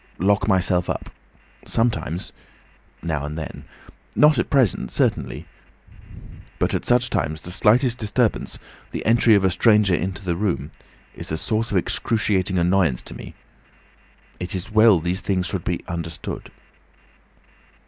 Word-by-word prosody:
Lock 95 +1 +2
myself 90 -2 +2
up. - - -4 0.5
Sometimes—now 85 -7 -4
and 75 +2 -5
then. 80 - -7 0.5
Not 150 -3 +5
at - - -1
present, 130 -8 +2
certainly. - - -1 1.1
At - - 0
such 120 0 +3
times 80 +1 -1
the 90 - -9
slightest 120 +6 +3
disturbance, 110 +1 0 0.3
the - - -5
entry 115 0 +5
of 100 - +2
a 95 - +3
stranger 105 0 +4
into 95 +3 -2
the 85 -2 0
room, 85 -7 -2 0.4
is - - -6
a 80 - -1
source 110 +7 -1
of 100 - +1
excruciating 95 -1 0
annoyance 90 -6 +2
to - - -8
me—it 90 +2 -12
is 95 +4 -5
well 110 -3 +6
these 90 +4 -2
things 90 -2 -1
should 90 -2 -3
be 90 - -2
understood." 85 -2 -5
95 Hz, 130 wpm, -22 LUFS, 85-110 Hz, 1.1 s, well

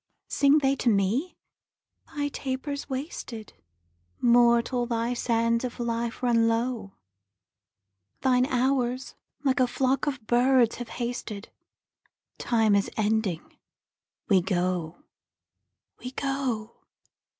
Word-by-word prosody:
Sing 280 +1 +4
they 275 -2 +2
to 245 - +1
me? 220 - 0 0.7
'Thy 290 -1 -3
taper's 280 +1 -4
wasted; 260 -5 -6 0.7
Mortal, 240 +1 +3
thy 235 0 -1
sands 230 -1 +1
of 245 -1 -5
life 235 0 -3
run 230 -2 +3
low; 230 -3 -1 1.3
Thine 255 -1 +3
hours 255 0 0 0.3
like 265 -2 +2
a 255 - +4
flock 260 +3 0
of 260 -6 -3
birds 245 0 +3
have 245 -1 -7
hasted: 235 -4 -5 0.9
Time 225 -3 +2
is 200 -1 +2
ending; 215 -5 -1 0.7
we 190 -3 +4
go, 180 - -2 1.0
we 250 - -6
go.' 260 -5 -3
240 Hz, 105 wpm, -27 LUFS, 225-260 Hz, 1.3 s, Sing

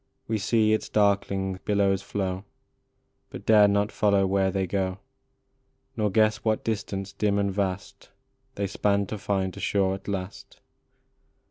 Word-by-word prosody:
We 110 -1 -1
see 110 +1 +2
its 110 - -1
darkling 100 -2 +1
billows 100 -2 +1
flow, 95 -1 -3 0.9
But - - -9
dare 105 -2 +6
not 100 +1 +1
follow 100 -2 +2
where 95 0 +2
they 95 0 -1
go, 95 0 -2 1.0
Nor 105 -1 +1
guess 110 +1 +3
what 110 0 -1
distance 100 -3 -3
dim 100 0 0
and 100 -1 0
vast 95 -1 -4 0.5
They 100 - -1
span 100 +1 +1
to 105 +2 -6
find 95 -2 -1
a - - -8
shore 95 -2 +1
at 95 0 -8
last. 95 -1 -6
100 Hz, 145 wpm, -26 LUFS, 95-105 Hz, 1.0 s, dare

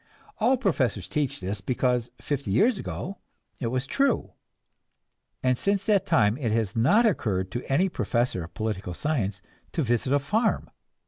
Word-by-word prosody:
All 245 +4 +4
professors 130 - 0
teach 145 -8 -1
this, 95 +2 -3
because 125 +2 0
fifty 140 -6 -3
years 210 - +3
ago 195 - -5 0.4
it 120 - -1
was 130 +2 -1
true, 275 - +1 1.1
and 130 -1 +2
since 200 0 0
that 210 -4 +2
time 105 +2 +3
it 120 -6 -1
has 110 -3 0
not 200 - +4
occurred 95 - 0
to 120 - -5
any 175 +8 +4
professor 120 - -1
of 85 +1 -11
political 100 -5 -3
science 105 - -1 0.3
to 160 - 0
visit 120 +1 0
a 145 - +5
farm. 215 - 0
125 Hz, 155 wpm, -26 LUFS, -, 1.1 s, a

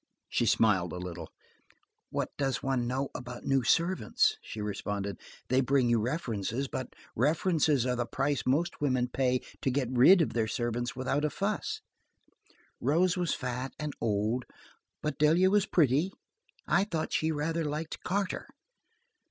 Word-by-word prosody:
She - - +1
smiled 95 -6 +3
a - - -4
little. 90 -2 -6 0.8
"What - - -2
does 135 -2 -1
one 130 -3 0
know 135 +2 -1
about 125 -1 -7
new 135 -1 +2
servants?" 170 - +2
she 110 - -8
responded. 100 -2 -3 0.3
"They 130 +2 +3
bring 130 -2 +2
you 115 - +4
references, 120 - -2
but 130 -1 -5 0.2
references 150 - +2
are 125 -1 +1
the 120 -1 -2
price 135 +3 0
most 150 +7 0
women 130 -4 +1
pay 130 -1 +1 0.2
to - - +1
get 130 -2 0
rid 170 +9 +7
of - - -3
their 115 -2 +1
servants 120 +2 -2
without 130 +3 -1
a 150 - +2
fuss. 200 +6 -2 1.0
Rose 175 +8 +2
was 175 -4 0
fat 125 +1 -4
and 150 -1 -4
old, 110 +3 0 0.6
but 150 - -2
Delia 165 +5 +5
was 205 -1 +3
pretty. 155 +3 +3 0.6
I 195 - +3
thought 165 -6 -3
she 160 +1 +1
rather 160 +2 -1
liked 155 +1 -4
Carter." 195 0 -1
130 Hz, 150 wpm, -30 LUFS, 120-155 Hz, 1.0 s, rid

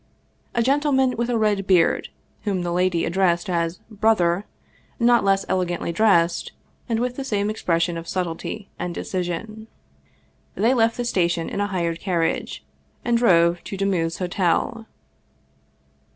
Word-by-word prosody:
A 235 - +2
gentleman 265 -1 +2
with 235 +1 -1
a 240 - +1
red 205 -3 +1
beard, 180 -3 +3 0.3
whom 195 -4 -1
the 175 - -2
lady 180 -1 +1
addressed 175 0 +1
as 170 0 -1
" - - -29
brother," 195 -4 +3 0.5
not 240 0 +4
less 195 0 +2
elegantly 175 -2 -1
dressed, 170 -3 +2 0.4
and 230 - +1
with 250 +1 -2
the 275 - -3
same 210 -5 -1
expression 170 -5 0
of 165 - -10
subtlety 185 +3 -4
and 175 -1 -4
decision. 195 +5 -4 0.9
They 230 +5 +3
left 230 -2 +2
the 245 - -2
station 175 -6 0
in - - -3
a 205 - +1
hired 170 -4 -2
carriage, 170 -4 -2 0.4
and 240 - +2
drove 175 -7 +3
to 195 - -5
Demuth's 180 -4 0
Hotel. 190 +6 -1
190 Hz, 145 wpm, -23 LUFS, 170-225 Hz, 0.9 s, not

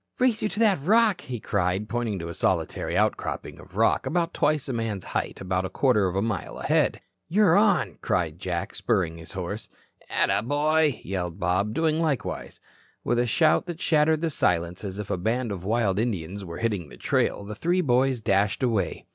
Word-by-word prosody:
"Race 250 -3 +2
you 210 - 0
to 200 - -8
that 210 -10 +3
rock," 210 +2 +3
he 125 -2 -6
cried, 100 0 -1
pointing 115 -3 -2
to 85 -2 -5
a 85 - -5
solitary - - -1
outcropping - - -1
of - - -15
rock, - - +2
about 170 0 0
twice 150 -1 +1
a 135 - -2
man's 115 -5 -2
height, - - -3
about 95 0 -1
a 95 - -3
quarter 105 -2 +2
of 90 - -3
a 95 - +1
mile 110 -3 -3
ahead. - - +1 0.3
"You're 185 -1 +4
on," 180 - +2
cried 85 -2 -1
Jack, 90 -3 -3
spurring 85 -2 0
his 80 - -10
horse. 95 +3 -5 0.4
"Attaboy," 145 +3 +2
yelled 90 -2 -3
Bob, 95 +4 0
doing 160 -1 +1
likewise. 145 -9 -2 0.4
With 120 - +1
a 120 - +2
shout 155 +9 +3
that 170 -2 -5
shattered 155 -1 +3
the 165 -1 0
silence 85 - 0
as 95 -1 -5
if 105 -1 -5
a - - 0
band 115 +5 -1
of 95 -3 -5
wild 105 -2 +1
Indians 100 -4 -2
were 85 -2 -7
hitting 100 -9 -2
the - - -13
trail, - - 0
the 105 - -6
three 175 - +1
boys 130 -3 +2
dashed 100 +2 +1
away. 115 -6 0
110 Hz, 190 wpm, -26 LUFS, 95-155 Hz, 0.4 s, You're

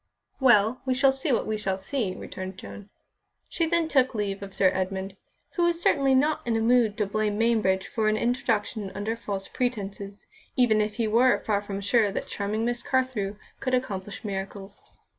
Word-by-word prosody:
"Well, 240 -2 +4
we 260 -1 0
shall 270 +1 +5
see 270 +2 -2
what 240 - +1
we 215 0 -1
shall 195 -2 -1
see," 195 -1 -2
returned 185 0 -7
Joan. 205 +1 -10 0.6
She 330 - -1
then 335 0 +2
took 260 -5 +2
leave 200 -2 -2
of 200 -1 -7
Sir 190 -1 +3
Edmund, 190 +1 -3 0.4
who 350 - 0
was 340 -1 +1
certainly 275 -5 +3
not 295 +4 +2
in 230 -2 0
a - - +1
mood 230 -2 +3
to 210 - +1
blame 210 0 -1
Mainbridge 215 -5 +2
for 215 -1 0
an 215 - +1
introduction 225 -4 -1
under 210 +3 -2
false 200 -4 -5
pretences, 205 -5 -4 0.3
even 230 -4 +4
if 210 0 -2
he 230 -2 0
were 240 +4 +3
far 205 -2 +1
from 200 -1 -5
sure 210 +1 +3
that - - -3
charming 215 +2 -2
Miss 240 0 -1
Carthew 255 -7 -1 0.2
could 255 -1 +1
accomplish 205 -3 -4
miracles. 195 0 -6
215 Hz, 185 wpm, -26 LUFS, 200-250 Hz, 0.6 s, shall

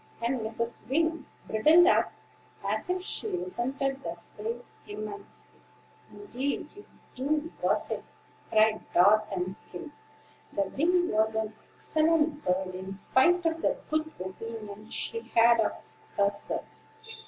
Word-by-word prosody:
'" - - -27
And 245 +2 +1
Mrs. 225 +1 -4
Wing 320 +1 +1 0.2
bridled 310 +11 +6
up, 370 - +4 0.6
as - - -1
if 365 0 0
she 435 - -2
resented 275 - -2
the 170 0 -4 0.2
phrase 230 +3 -5 0.2
immensely. 215 - -8 0.5
"Indeed 285 -5 -4
you 410 - -12 0.3
do, 300 +5 -1
gossip," - - 0 0.5
cried 220 0 +4
Dart 210 +4 +6
and 185 -1 -2
Skim; 180 +10 -9 0.6
for 200 - +2
Wing 350 +4 +2
was 220 +1 +2
an 220 0 -1 0.2
excellent 310 -1 +2
bird, 185 0 0
in 190 +1 -6
spite 340 - +3
of 325 0 +1
the - - +1
good 310 0 0
opinion 210 +2 -7
she 460 - -1 0.2
had 235 0 +7
of 220 - -1 0.3
herself. 200 0 +1
240 Hz, 130 wpm, -29 LUFS, 215-320 Hz, 0.6 s, had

